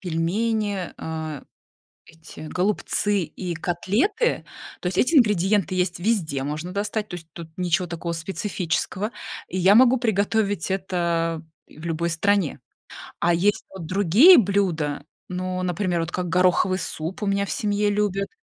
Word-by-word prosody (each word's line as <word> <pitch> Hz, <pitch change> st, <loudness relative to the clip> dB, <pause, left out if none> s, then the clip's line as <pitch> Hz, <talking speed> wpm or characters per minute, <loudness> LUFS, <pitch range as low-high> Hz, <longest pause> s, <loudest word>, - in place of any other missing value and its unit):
пельмени, 200 Hz, +3 st, -1 dB
а, 160 Hz, -3 st, -5 dB, 0.6 s
эти 165 Hz, 0 st, -13 dB
голубцы 205 Hz, +1 st, 0 dB
и 170 Hz, +3 st, -5 dB
котлеты- 215 Hz, -, 0 dB, 0.4 s
то -, -, -6 dB
есть 180 Hz, -, -3 dB
эти 320 Hz, +6 st, +3 dB
ингредиенты 205 Hz, -, +3 dB
есть 180 Hz, -1 st, -1 dB
везде, 175 Hz, -10 st, 0 dB
можно 150 Hz, +5 st, -4 dB
достать, 210 Hz, +2 st, -2 dB
то 180 Hz, -, -7 dB
есть 165 Hz, -1 st, -12 dB
тут 170 Hz, -2 st, -9 dB
ничего 180 Hz, 0 st, 0 dB
такого 170 Hz, 0 st, -4 dB
специфического, 190 Hz, +4 st, -3 dB, 0.4 s
и 185 Hz, -, -3 dB
я 190 Hz, +3 st, +5 dB
могу 255 Hz, +1 st, +6 dB
приготовить 205 Hz, -4 st, 0 dB
это 170 Hz, -3 st, -1 dB, 0.3 s
и -, -, -17 dB
в 160 Hz, -, -10 dB
любой 170 Hz, +1 st, -1 dB
стране. 195 Hz, 0 st, +1 dB, 0.6 s
А 175 Hz, -, +3 dB
есть 205 Hz, +5 st, +1 dB
вот 190 Hz, -4 st, -8 dB
другие 205 Hz, -, +7 dB
блюда. 175 Hz, -9 st, 0 dB, 0.2 s
Ну, 185 Hz, 0 st, -3 dB
например, 180 Hz, -1 st, -1 dB
вот 165 Hz, +1 st, -3 dB
как 180 Hz, -1 st, -2 dB
гороховый 185 Hz, +2 st, +2 dB
суп 165 Hz, +2 st, -4 dB
у 205 Hz, -, 0 dB
меня 200 Hz, 0 st, +1 dB
в -, -, -7 dB
семье 205 Hz, 0 st, 0 dB
любят. 200 Hz, -1 st, 0 dB
185 Hz, 145 wpm, -23 LUFS, 170-205 Hz, 0.6 s, другие